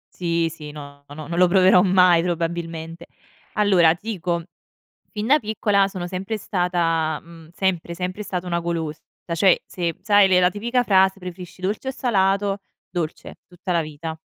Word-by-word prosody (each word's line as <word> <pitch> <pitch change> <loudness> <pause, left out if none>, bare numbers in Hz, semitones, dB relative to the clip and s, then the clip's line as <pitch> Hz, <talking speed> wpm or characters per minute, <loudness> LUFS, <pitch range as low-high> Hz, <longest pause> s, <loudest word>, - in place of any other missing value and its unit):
Sì, 170 -2 0
sì, 150 -2 -9
no, 145 -1 -11
no, - - -9
no, 155 -1 -8
non 170 - -4
lo 180 - +6
proverò 185 0 +5
mai 180 -3 +5
probabilmente. 165 -1 -4 0.5
Allora, 185 -6 +4
ti 215 +6 -6
dico, 170 -2 -2 0.7
fin 215 0 -4
da 295 +4 +5
piccola 205 -2 +1
sono 180 -2 -5
sempre 190 +4 -4
stata, 170 -5 0
mhmm, 165 -1 -15
sempre, 175 -2 -1
sempre 185 +3 -4
stata 180 -3 -4
una 170 -1 -1
golosa. 165 -2 -3 0.2
Da 170 - -3
cioè, 185 +2 +4
se 170 -2 -3
sai 205 -2 +5
le 180 -1 +4
la 180 - +4
tipica 235 +6 0
frase 190 -2 +3
"preferisci 180 0 -9
dolce 205 +7 -2
o - - +1
salato": 200 -5 +1 0.3
dolce, 170 -3 -5
tutta 180 +1 -5
la 170 - +2
vita. 155 +1 -7
180 Hz, 170 wpm, -22 LUFS, 165-195 Hz, 0.7 s, lo